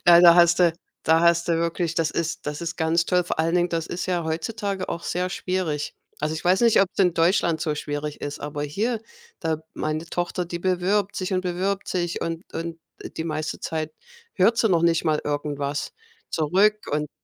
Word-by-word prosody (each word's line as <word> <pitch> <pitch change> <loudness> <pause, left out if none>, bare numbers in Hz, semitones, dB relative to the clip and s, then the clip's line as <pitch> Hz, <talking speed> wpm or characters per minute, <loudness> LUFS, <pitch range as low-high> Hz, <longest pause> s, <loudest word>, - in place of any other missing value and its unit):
Ja, 170 0 +9
da 170 -1 +9
hast 170 -1 +5
du 175 -2 +5 0.3
da 160 +1 +4
hast 170 0 +3
du 165 - +2
wirklich 170 0 -1
das 165 -2 +1
ist 165 -2 -3
das 150 0 -3
ist 165 -1 -4
ganz 165 +1 +2
toll. 180 0 +2
Vor 175 - -3
allen 165 +2 +1
Dingen, 175 0 +3
das 165 -1 -2
ist 175 - -4
ja 175 -2 0
heutzutage 195 +4 -3
auch 170 - -4
sehr 180 +1 -2
schwierig. 180 -6 -2 0.3
Also 155 +1 -1
ich 160 - -6
weiß 185 +5 +3
nicht, 230 -2 +6
ob's 195 0 -1
in 180 -3 +4
Deutschland 165 -1 +2
so 155 -1 0
schwierig 150 0 -4
ist, 145 0 -5
aber 145 0 -4
hier, 215 +10 -1 0.4
da 160 -2 -1 0.2
meine 155 +2 -2
Tochter, 175 +2 -2
die 170 0 -4
bewirbt 185 +3 +1
sich 185 0 -3
und 185 0 +1
bewirbt 190 +2 -2
sich 175 -2 -1
und 165 +2 -3
und 165 0 -4 0.4
die 160 - -2
meiste 155 -1 -3
Zeit 155 -1 -3 0.4
hört 210 +5 +4
sie 225 - +3
noch 170 -4 +3
nicht 170 0 +3
mal 155 -2 +2
irgendwas 145 -1 -2 0.4
zurück 195 +7 +2
und 150 +1 -1
170 Hz, 200 wpm, -24 LUFS, 160-180 Hz, 0.4 s, Ja